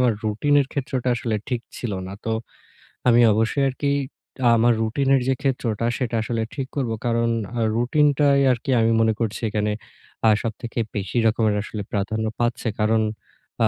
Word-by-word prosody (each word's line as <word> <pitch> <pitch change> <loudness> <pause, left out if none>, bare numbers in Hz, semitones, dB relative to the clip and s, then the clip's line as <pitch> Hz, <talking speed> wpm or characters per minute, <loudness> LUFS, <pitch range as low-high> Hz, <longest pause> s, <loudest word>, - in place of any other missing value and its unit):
আমার 125 -2 +4
রুটিনের 140 +6 +2
ক্ষেত্রটা 130 -3 -2
আসলে 115 -1 -2
ঠিক 125 -2 -1 0.2
ছিল 120 -4 -4
না। 95 - -7
তো 115 - -1 0.8
আমি 120 0 +6
অবশ্যই 110 +6 +1
আরকি 140 +2 -1 0.7
আমার 120 +1 +4
রুটিনের 135 +4 +2
যে 135 - +3
ক্ষেত্রটা 120 -5 -1
সেটা 120 -3 -2
আসলে 115 0 -2
ঠিক 135 -2 -4
করব। 130 -5 -1
কারণ 115 0 +1 0.3
আ - - 0 0.2
রুটিনটাই 140 +3 +3
আরকি 125 +3 -2
আমি 115 0 +3
মনে 110 -1 +3
করছি 110 -1 -2
এখানে 105 0 0 0.6
আ - - +7
সবথেকে 115 +1 -4 0.2
বেশি 100 +3 -3
রকমের 110 -1 +2
আসলে 105 -1 -6
প্রাধান্য 110 +2 -1
পাচ্ছে। 120 0 -1
কারণ 110 +1 +3 0.6
আ - - +5
115 Hz, 160 wpm, -23 LUFS, 110-130 Hz, 0.8 s, আ